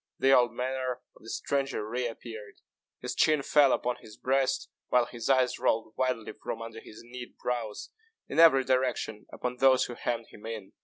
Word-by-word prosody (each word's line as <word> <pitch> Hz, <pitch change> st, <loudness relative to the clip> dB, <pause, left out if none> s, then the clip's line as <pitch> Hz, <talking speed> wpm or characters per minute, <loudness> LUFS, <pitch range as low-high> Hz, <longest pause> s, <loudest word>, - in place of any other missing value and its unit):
The 135 Hz, 0 st, +5 dB
old 120 Hz, -2 st, +4 dB
manner 130 Hz, +1 st, -3 dB
of -, -, -19 dB
the 115 Hz, -, -11 dB
stranger 135 Hz, -6 st, -1 dB
re 120 Hz, +2 st, -1 dB
appeared. 110 Hz, -2 st, -9 dB, 0.5 s
His -, -, -3 dB
chin 155 Hz, -3 st, +3 dB
fell 145 Hz, -2 st, +5 dB
upon 125 Hz, 0 st, 0 dB
his 110 Hz, -1 st, -14 dB
breast, 135 Hz, 0 st, +1 dB, 0.2 s
while 125 Hz, -1 st, +4 dB
his 120 Hz, 0 st, -6 dB
eyes 130 Hz, -2 st, +3 dB
rolled 110 Hz, 0 st, +1 dB
wildly 130 Hz, -4 st, -1 dB
from 115 Hz, -, -6 dB
under 115 Hz, 0 st, -7 dB
his 115 Hz, +1 st, -13 dB
knit 120 Hz, 0 st, -9 dB
brows, 115 Hz, -4 st, -3 dB, 0.4 s
in -, -, -2 dB
every 155 Hz, -5 st, +8 dB
direction, 125 Hz, -4 st, 0 dB
upon 125 Hz, 0 st, -4 dB
those 130 Hz, 0 st, +5 dB
who 120 Hz, -, -6 dB
hemmed 115 Hz, -1 st, -2 dB
him 105 Hz, -, -11 dB
in. 110 Hz, -4 st, -7 dB
125 Hz, 185 wpm, -29 LUFS, 115-130 Hz, 0.5 s, every